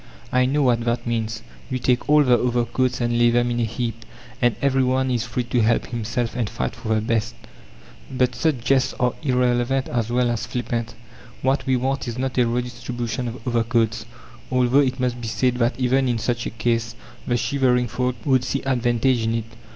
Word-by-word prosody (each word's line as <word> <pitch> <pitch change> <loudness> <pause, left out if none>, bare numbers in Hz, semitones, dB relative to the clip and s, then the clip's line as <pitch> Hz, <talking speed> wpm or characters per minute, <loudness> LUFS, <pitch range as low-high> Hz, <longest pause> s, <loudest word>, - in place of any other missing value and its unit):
I 125 0 +3
know 145 +2 +1
what 120 -3 +2
that 120 0 -1
means. 115 -1 -2 0.3
You 130 - -1
take 125 +2 0
all 150 0 +6
the 125 -3 +5
overcoats 120 +1 0
and 120 0 +1
lay 120 0 +5
them 120 +1 +2
in 120 - -1
a 115 - +2
heap, 115 0 -4 0.4
and 120 -1 +3
every 135 -1 +2
one 130 +1 +1
is 120 -1 0
free 125 +1 -2
to 120 0 0
help 115 +2 +2
himself 120 0 -3
and 120 -4 -1
fight 65 - -3
for 110 0 -1
the 110 - +1
best." 115 +1 -1 0.7
But 125 -1 +1
such 130 0 0
jests 130 0 +2
are 125 0 +2
irrelevant 125 -1 +1
as 120 -2 -1
well 120 0 +2
as 120 0 -3
flippant. 120 -2 -3 0.5
What 135 +2 +1
we 130 - +3
want 135 +2 -1
is 120 0 -4
not 130 0 -1
a 120 - +4
redistribution 120 0 -3
of 120 +3 -8
overcoats, 115 -2 0 0.4
although 125 +1 +3
it 130 -2 +1
must 125 -1 -1
be 115 - -4
said 125 +2 0
that 120 +2 0
even 130 +1 +2
in 120 -2 +1
such 120 +1 -2
a - - -2
case, 115 0 -1 0.3
the 120 - +2
shivering 125 0 +1
folk 125 +2 -1
would 130 -3 +3
see 135 +2 -2
advantage 120 -1 +1
in 115 0 0
it. 115 -1 -2
120 Hz, 200 wpm, -22 LUFS, 115-130 Hz, 0.7 s, all